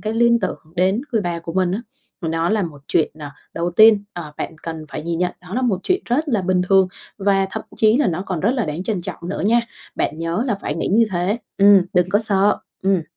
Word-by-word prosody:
cái 215 - -2
liên 235 +1 +3
tưởng 185 - -2 0.2
đến 190 +5 +2
người 225 - +2
bà 175 -2 -2
của 170 0 -7
mình 185 0 +1
á, 200 - -1 0.4
mà 165 - -3
đó 165 +1 0
là 215 -1 +1
một 155 -5 -6
chuyện 160 - +2
à, 145 -2 -8 0.2
đầu 170 +1 -1
tiên, 215 +2 +6
ờ, 160 -4 -7
bạn - - -5
cần 160 -1 -6
phải - - -6
nhìn 170 +1 -2
nhận 180 0 0
đó 180 +2 -9
là 255 - 0
một 220 -7 +1
chuyện 370 0 +1
rất 295 +6 0
là 220 -8 +1
bình 185 0 +1
thường, 190 -1 +5 0.3
và 195 -1 +2
thậm - - -4
chí 220 +1 +4
là 285 -1 +2
nó 175 +1 -1
còn 180 -4 -2
rất 205 - +2
là 250 -3 0
đáng 155 +3 -4
trân 200 -2 -2
trọng 170 0 -7
nữa 195 - -3
nha. 235 +2 +4 0.3
Bạn 150 - -1
nhớ 165 +7 -1
là 235 - +1
phải - - -3
nghĩ 165 - -2
như 230 +3 +5
thế, 180 +5 0 0.2
ừm, 200 -1 +7
đừng 180 -2 +3
có 205 - +4
sợ, 205 -2 +2 0.2
ừm. 190 -2 +2
190 Hz, 255 wpm, -20 LUFS, 170-215 Hz, 0.4 s, ừm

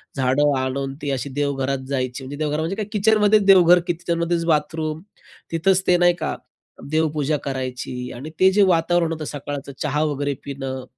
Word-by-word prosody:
झाडं 140 +2 +2
आणून 135 +1 -2
ती 145 - -2
अशी 135 +1 -3
देवघरात 135 -1 -1
जायची, 130 -1 -2
म्हणजे 140 +2 -7
देवघर 150 -1 -1
म्हणजे 165 +5 -2
काय, 215 0 -3
किचनमध्येच 210 0 +3
देवघर 180 -2 +7
की - - +1
किचनमध्येच 170 0 -1
बाथरूम, 155 0 -1 0.5
तिथंच 185 +3 +2
ते 180 - +5
नाही 175 0 +4
का 155 - -2 0.6
देवपूजा 155 -1 0
करायची 125 -2 -4
आणि 135 +6 -7
ते 190 0 +6
जे 205 +2 +3
वातावरण 170 -1 +2
होतं 155 -1 -4
सकाळचं, 145 -1 -6
चहा 150 0 0
वगैरे 145 -2 -1
पिणं, 135 -2 -5
150 Hz, 165 wpm, -22 LUFS, 135-170 Hz, 0.6 s, देवघर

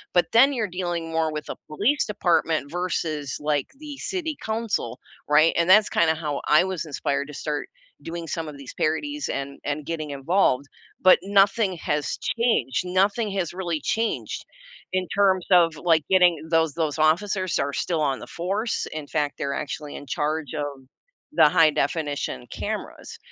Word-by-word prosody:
but 175 - +5
then 270 +5 +6
you're 220 -5 -1
dealing 170 -2 -2
more 160 -1 +1
with 150 0 -6
a - - -4
police 215 - +1
department 170 -6 +1
versus, 160 -6 -2
like, 150 -1 0
the 300 -1 -8
city 345 -6 -3
council, 220 - -2 0.3
right? 155 +2 +5
And 170 +1 +1
that's 205 +2 +7
kinda 160 -1 +3
how 150 -3 -3
I 155 +3 +6
was 185 -3 -3
inspired 140 -1 -2
to 150 - -10
start 150 -1 -3 0.3
doing 165 0 -6
some 165 +1 -3
of 150 -2 -8
these 140 -2 -10
parodies 290 - -1
and 140 0 -4
and 145 0 -3
getting 155 -3 -4
involved, 140 -1 +1 0.4
but 185 0 +7
nothing 195 0 +3
has 150 -1 -2 0.2
changed, 185 - +1
nothing 200 +4 +1
has 185 -4 -2
really 175 -4 -3
changed 225 +1 -2 0.5
in 185 0 +1
terms 190 -3 +2
of, 170 -3 +5
like, 165 -3 +2
getting 180 -2 +6 0.2
those 160 -3 +2
those 160 -2 -1
officers 185 +4 +2
are 140 0 -1
still 165 -3 -1
on 135 -3 0
the - - -10
force, 200 +6 -1
in 155 -2 -5
fact, 145 -2 -1
they're 140 -2 -2
actually 150 -2 -6
in 145 - -8
charge 150 +1 -2
of 145 -3 -5 0.5
the 155 -3 +6
high 160 -1 +5
definition 145 - -2
cameras, - - -5
165 Hz, 165 wpm, -24 LUFS, 150-190 Hz, 0.5 s, that's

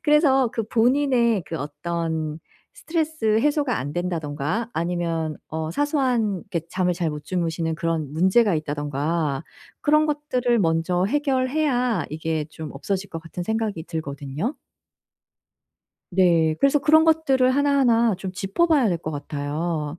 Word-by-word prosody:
그래서 290 -4 +4
그 225 - -1
본인의 235 -1 +2
그 165 - -4
어떤 160 +1 -3 0.4
스트레스 315 -10 0
해소가 290 -1 +1
안 140 +3 -4
된다든가 170 +4 -2
아니면 165 -2 -2
어 160 0 -3
사소한 250 - +1
그렇게 170 - -1
잠을 180 -1 0
잘 170 -2 -1
못 150 0 -6
주무시는 165 -2 -1
그런 165 -3 -2
문제가 190 +5 +4
있다든가 145 0 -2 0.4
그런 305 +1 +4
것들을 255 -5 0
먼저 170 0 +1
해결해야 255 - +1
이게 160 0 -2
좀 155 -1 -7
없어질 190 +7 -3
것 165 - -5
같은 170 +2 -6
생각이 220 -3 -2
들거든요. 150 - -4 1.6
네. 170 -4 +3
그래서 275 +1 +4
그런 315 +3 +5
것들을 275 -6 +3
하나하나 260 -6 +3
좀 190 0 -5
짚어 195 - 0
봐야 295 -8 +3
될 175 -3 0
것 155 - -5
같아요. 150 +2 -3
185 Hz, 295 characters per minute, -23 LUFS, 160-255 Hz, 1.6 s, 그런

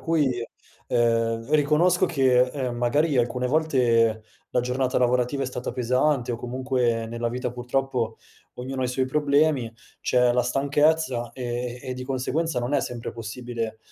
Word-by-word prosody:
cui, 135 -8 0 0.4
ehm, 115 -1 +1
riconosco 155 +5 +3
che, 130 -7 +3
ehm, 125 -1 -3
magari 145 +5 +1
alcune 125 +1 +1
volte 125 -7 +2 0.3
la 125 - +2
giornata 125 +1 0
lavorativa 125 +2 +1
è - - -2
stata 125 -1 -4
pesante 125 +1 +1
o 120 - -1
comunque 125 -2 -1
nella 115 +1 -3
vita 125 +1 -3
purtroppo 125 -2 -2 0.4
ognuno 130 +1 -4
ha - - +1
i - - 0
suoi 130 +1 0
problemi, 145 -3 +2 0.3
c'è 125 -1 +3
la 125 0 +2
stanchezza 140 -1 +1
e 125 -1 -4
e 130 - -5
di 130 0 -6
conseguenza 135 +3 -1
non 120 +4 -1
è - - +3
sempre 120 -1 -5
possibile, 115 0 -5
125 Hz, 150 wpm, -25 LUFS, 120-135 Hz, 0.4 s, riconosco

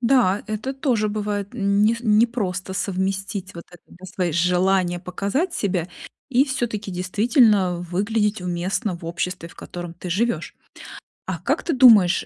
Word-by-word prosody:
Да, 235 -6 +3
это 215 +5 -3
тоже 250 -6 0
бывает, 205 -1 -3
нес 210 +1 +2
непросто 210 -5 +1
совместить 195 0 -3
вот 170 - -9
это, 175 - -16
да, 180 - -15
свои 180 -5 -1
желания 180 +1 +2
показать 200 - -2
себя 180 -4 -1 0.4
и 265 +1 +4
всё-таки 235 -7 -3
действительно 195 - +2
выглядеть 205 +4 -1
уместно 180 +4 -2
в 170 - -13
обществе, 170 +1 -4
в - - -17
котором 175 -1 -8
ты 180 - -8
живешь. 235 +7 -1 0.7
А - - -2
как - - -1
ты 330 - -1
думаешь, 220 -9 +6
200 Hz, 140 wpm, -22 LUFS, 180-225 Hz, 0.7 s, думаешь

